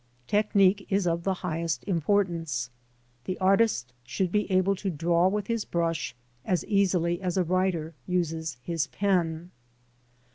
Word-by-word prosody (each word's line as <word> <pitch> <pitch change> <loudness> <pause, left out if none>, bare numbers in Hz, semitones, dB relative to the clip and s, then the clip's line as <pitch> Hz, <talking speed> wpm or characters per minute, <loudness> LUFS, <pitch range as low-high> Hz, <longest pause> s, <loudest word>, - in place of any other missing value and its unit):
Technique 200 - +3
is 195 -2 +1
of 170 0 0
the 190 +2 0
highest 165 -1 -2
importance. 165 -8 0 0.5
The 185 - -3
artist 190 - +2
should 175 +9 -2
be 210 0 0
able 185 +1 +3
to 195 +1 -2
draw 170 +2 +2
with 205 +1 -1
his 230 -1 -1
brush 165 -4 -2 0.3
as 180 +3 0
easily 180 -4 +1
as 180 -1 -2
a 185 - +3
writer 175 -2 0
uses 165 -5 -1
his 165 -1 -1
pen. 175 -3 0
180 Hz, 140 wpm, -27 LUFS, 165-195 Hz, 0.5 s, Technique